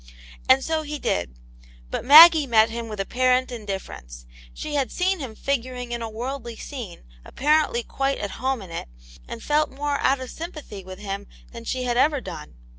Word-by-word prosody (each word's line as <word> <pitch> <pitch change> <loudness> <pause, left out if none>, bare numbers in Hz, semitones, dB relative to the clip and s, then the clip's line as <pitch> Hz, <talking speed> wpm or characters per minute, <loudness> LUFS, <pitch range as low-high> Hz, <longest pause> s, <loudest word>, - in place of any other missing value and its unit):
And 265 +1 +6
so 320 -1 0
he 300 0 -5
did. 85 - -2 0.6
But - - -3
Maggie 310 +2 +9
met 225 -2 +4
him 235 0 -5
with 210 -2 -7
apparent 255 +5 +1
indifference. 190 - -7 0.3
She 295 - -7
had 275 -3 0
seen 370 +1 0
him 255 -6 -7
figuring 250 -2 -3
in 235 0 -3
a 225 - -4
worldly 240 +1 -5
scene, 235 - -8 0.2
apparently 295 -4 +1
quite 275 +3 -1
at 205 - -4
home 260 -4 -1
in 180 - -12
it, 165 - -6 0.4
and - - -8
felt 300 +1 +1
more 285 +1 -2
out 270 0 +2
of 260 -1 -7
sympathy 305 - -8
with 185 0 -9
him 200 0 -6 0.2
than 230 -1 -10
she 255 +2 -2
had 240 -1 -1
ever 290 +2 +3
done. 175 - -9
250 Hz, 185 wpm, -24 LUFS, 215-285 Hz, 0.6 s, Maggie